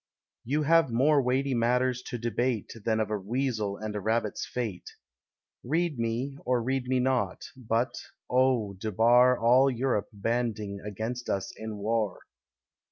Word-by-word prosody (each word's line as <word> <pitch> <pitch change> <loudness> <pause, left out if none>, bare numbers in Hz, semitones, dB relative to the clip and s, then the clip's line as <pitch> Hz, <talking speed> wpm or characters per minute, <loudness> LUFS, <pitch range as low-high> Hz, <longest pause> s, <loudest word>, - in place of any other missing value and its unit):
You 145 +5 0
have 165 -1 +4
more 140 +5 +4
weighty 130 +2 0
matters 125 +1 +1
to 120 - -4
debate 120 -1 -1
Than 110 -1 +1
of 110 -1 -1
a 105 - -1
Weasel 110 -1 -2
and 110 -1 -5
a - - -1
Rabbit's 110 +1 -1
fate. 110 -8 -4 0.7
Read 160 0 0
me, 120 +5 -2
or 125 -1 +1
read 130 0 -1
me 130 0 +2
not; 125 -7 0
but, 120 -1 -1 0.3
oh, 125 -5 +2
debar 115 +6 +4
All 125 +4 +5
Europe 125 -4 -1
banding 110 -1 -2
against 110 +4 -5
us 95 -1 -2
in 110 -1 -6
war. 105 -1 -1
120 Hz, 145 wpm, -28 LUFS, 110-130 Hz, 0.7 s, All